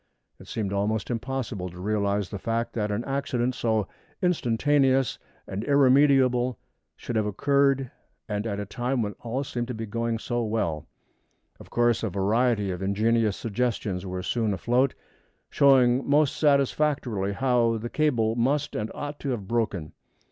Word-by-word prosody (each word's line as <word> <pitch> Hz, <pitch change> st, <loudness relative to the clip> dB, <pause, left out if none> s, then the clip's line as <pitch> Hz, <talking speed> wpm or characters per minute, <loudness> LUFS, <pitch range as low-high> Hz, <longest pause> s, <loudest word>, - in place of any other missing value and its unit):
It -, -, -14 dB
seemed 100 Hz, -3 st, -3 dB
almost 105 Hz, +2 st, -1 dB
impossible 120 Hz, -6 st, -3 dB
to 90 Hz, +1 st, -12 dB
realize 100 Hz, 0 st, 0 dB
the 100 Hz, -, -6 dB
fact 115 Hz, +3 st, -2 dB
that 105 Hz, -2 st, -1 dB
an 105 Hz, +3 st, -2 dB
accident 135 Hz, -3 st, -1 dB
so 110 Hz, -4 st, 0 dB, 0.3 s
instantaneous 135 Hz, -, +2 dB, 0.3 s
and 100 Hz, +3 st, -4 dB
irremediable 130 Hz, -2 st, +4 dB, 0.4 s
should 120 Hz, -, -6 dB
have 110 Hz, -1 st, +1 dB
occurred, 135 Hz, +3 st, +2 dB, 0.4 s
and 105 Hz, 0 st, -2 dB
at 100 Hz, -2 st, -3 dB
a 105 Hz, -, -3 dB
time 120 Hz, +4 st, -1 dB
when 105 Hz, -1 st, -3 dB
all 125 Hz, +4 st, -3 dB
seemed 120 Hz, -3 st, -4 dB
to 125 Hz, -, -4 dB
be 115 Hz, +1 st, -4 dB
going 115 Hz, +2 st, -2 dB
on -, -, -2 dB
so 120 Hz, +1 st, -2 dB
well. 105 Hz, -9 st, -2 dB, 0.7 s
Of -, -, -13 dB
course 120 Hz, -1 st, +2 dB
a 110 Hz, -, -1 dB
variety 105 Hz, +2 st, +1 dB
of 90 Hz, 0 st, -5 dB
ingenious 105 Hz, +2 st, +1 dB
suggestions 110 Hz, -4 st, -2 dB
were 90 Hz, -1 st, -5 dB
soon 110 Hz, -1 st, 0 dB
afloat, 125 Hz, +7 st, +1 dB, 0.6 s
showing 130 Hz, -2 st, +5 dB
most 145 Hz, -1 st, +3 dB
satisfactorily 140 Hz, -8 st, +1 dB
how 120 Hz, -1 st, +2 dB
the 115 Hz, +2 st, -5 dB
cable 120 Hz, -8 st, +1 dB
must 135 Hz, +5 st, 0 dB
and 105 Hz, +1 st, -2 dB
ought 145 Hz, 0 st, -5 dB
to 140 Hz, -, -4 dB
have 110 Hz, -7 st, -3 dB
broken. 105 Hz, -9 st, -2 dB
115 Hz, 155 wpm, -26 LUFS, 105-130 Hz, 0.7 s, showing